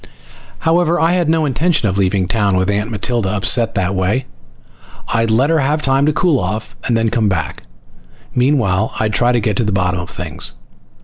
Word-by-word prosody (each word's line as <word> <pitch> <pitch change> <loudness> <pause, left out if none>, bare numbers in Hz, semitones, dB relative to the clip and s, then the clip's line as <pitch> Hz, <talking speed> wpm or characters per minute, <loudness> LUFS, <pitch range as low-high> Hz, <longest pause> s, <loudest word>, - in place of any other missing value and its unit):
However, 170 +1 +2
I 165 +1 +3
had 175 -3 +1
no 160 -1 +2
intention 150 -1 +1
of 95 - -1
leaving 95 -1 +1
town 100 -2 +1
with 95 +2 +1
Aunt 105 +2 -1
Matilda 110 -1 -2
upset 105 +4 +1
that 95 -1 0
way. 95 +8 0 0.8
I'd 115 0 +1
let 130 +8 +2
her 165 - +3
have 150 +2 0
time 135 +2 +2
to - - +4
cool 155 -2 +1
off, 105 +4 -4
then 115 -1 +2
come 110 -2 +1
back. 95 - -3 0.7
Meanwhile 120 -6 +1
I'd 110 -1 0
try 120 +2 +2
to 120 - +2
get 105 -2 -1
to - - +1
the 105 - -1
bottom 90 -2 0
of 90 - -6
things. - - -2
115 Hz, 190 wpm, -17 LUFS, 100-140 Hz, 0.8 s, to